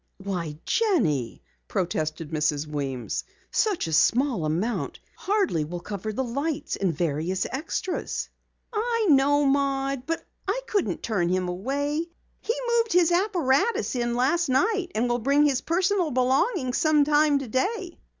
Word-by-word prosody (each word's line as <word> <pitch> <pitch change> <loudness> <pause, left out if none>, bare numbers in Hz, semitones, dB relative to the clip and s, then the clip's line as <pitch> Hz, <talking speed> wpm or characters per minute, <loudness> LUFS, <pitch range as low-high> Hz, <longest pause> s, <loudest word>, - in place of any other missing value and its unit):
"Why, 180 -6 -4
Jenny," 160 - +1 0.2
protested 155 - -2
Mrs. 150 -1 0
Weems, 140 -5 -3 0.3
"such 420 -6 +1
a 160 - -4
small 230 - +3
amount 180 +10 -2 0.2
hardly 390 - 0
will 175 +4 -5
cover 205 +3 -5
the 265 +5 -2
lights 285 +5 -2
and 190 -3 0
various 165 +3 -1
extras." 325 +6 -3 0.5
"I 460 +1 0
know, 285 +1 +4
Maud, 275 -1 0
but 330 0 -2 0.2
I - - 0
couldn't 410 -5 -1
turn 185 -7 0
him 185 0 0
away. 285 - -2 0.3
He 460 - -2 0.2
moved 455 -4 0
his 355 -1 +4
apparatus 350 - +1
in 240 -1 0
last 290 +6 +2
night 385 - +2
and 235 +3 +1
will 240 0 0
bring 280 +5 +3
his 270 -3 +2
personal 360 0 +1
belongings 260 - +1
sometime 300 -1 +4
today." 335 - -2
270 Hz, 135 wpm, -26 LUFS, -, 0.5 s, know